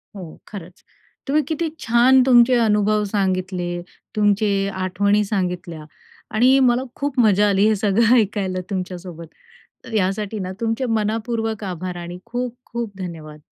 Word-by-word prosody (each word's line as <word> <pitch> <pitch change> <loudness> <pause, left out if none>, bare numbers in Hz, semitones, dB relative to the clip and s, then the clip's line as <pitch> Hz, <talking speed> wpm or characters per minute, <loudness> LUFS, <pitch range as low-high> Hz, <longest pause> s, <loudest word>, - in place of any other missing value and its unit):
हो, 180 -5 -10
खरंच 180 -3 -11 0.4
तुम्ही 295 +3 +2
किती 320 +1 -2
छान 245 +3 +4
तुमचे 245 -1 +6
अनुभव 210 0 +2
सांगितले. 185 -3 -1 0.5
तुमचे 205 0 +2 0.2
आठवणी 200 +3 +1
सांगितल्या 180 -5 -3 0.5
आणि 255 +4 +5
मला 250 -1 +3
खूप 280 -2 -3
मजा 210 -3 +4
आली 200 +1 +3
हे 220 - +3
सगळं 215 +3 +3
ऐकायला 195 -5 0
तुमच्यासोबत. 180 -3 -6 0.6
तर 230 - -10
यासाठी 205 +1 -1
ना 185 -1 -4
तुमचे 230 +3 -1
मनापूर्वक 225 -1 -2
आभार 180 -1 -5
आणि 175 +1 -7
खूप-खूप 240 -2 -5
धन्यवाद. 160 -5 -8
210 Hz, 130 wpm, -21 LUFS, 185-230 Hz, 0.6 s, तुमचे